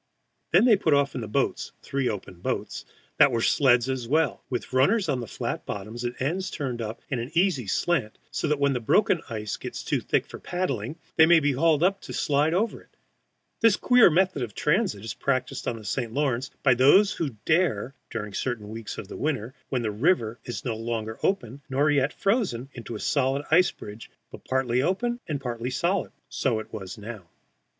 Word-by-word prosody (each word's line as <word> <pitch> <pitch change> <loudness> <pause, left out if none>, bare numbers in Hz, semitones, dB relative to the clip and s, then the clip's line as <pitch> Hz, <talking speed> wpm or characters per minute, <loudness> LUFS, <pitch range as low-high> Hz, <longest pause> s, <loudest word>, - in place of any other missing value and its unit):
] - - -49
Then - - +6
they 235 -4 +7
put 160 -6 +3
off 140 -1 +2
in 125 - -4
the 110 - -5
boats 105 - -1
three 135 -2 -1
open 95 -4 -6
boats - - -3 0.3
that - - +7
are 115 - 0
sleds 125 0 +4
as 130 -3 -2
well, 155 +5 +1
with 125 0 -4
runners 185 - +3
on 135 -4 0
the 120 - -6
flat - - -4
bottoms 110 +4 -5
and 120 0 -4
ends 175 +8 -1
turned 130 -8 -4
up 110 0 -6
in 130 - 0
an 120 +2 -4
easy 170 - +2
slant, 125 - 0
so - - -1
that 150 0 +1
when 140 0 +2
the 125 - -1
broken 175 - +3
ice 110 -2 -4
gets - - -6
too - - 0
thick - - 0
for - - -10
paddling 150 - -3 0.2
they 160 - +7
may 170 0 +7
be 145 -2 +1
hauled 155 +3 +2
up 195 +2 +2
to - - -8
slide 150 +2 +2
over 220 +4 0
it. - - -26 0.6
This 225 -3 +5
queer 245 -3 +6
method 180 -2 +2
of 115 -4 -4
transit 150 - 0
is 110 - -4
practised 130 +2 -2
on 115 - -1
the 110 - -11
St. 115 +3 -2
Lawrence, 135 -1 0
by 130 - +6
those 145 +12 +5
who 140 -9 -4
dare, 155 - +1 0.2
during 105 -3 -5
certain 110 -2 -3
weeks 110 0 -7
of 95 - -7
winter 130 -6 -2 0.2
when 125 -3 -1
the 110 - -1
river 115 - +1
is 120 - -6
no 120 -3 -1
longer 110 -1 -4
open 140 - -1
nor 140 +3 +2
yet 140 0 +2
frozen 195 - 0
into 120 -1 -7
a - - -5
solid 140 +3 0
ice 180 +3 +6
bridge, 105 +2 -10 0.2
but - - -12
partly 130 -1 +1
open 240 - 0
and 150 -4 -2
partly 120 -2 -4
solid. 175 +8 0 0.2
So 125 -5 0
it 110 - -10
was 95 -4 -6
now. 105 -4 -8
130 Hz, 205 wpm, -26 LUFS, 115-160 Hz, 0.6 s, they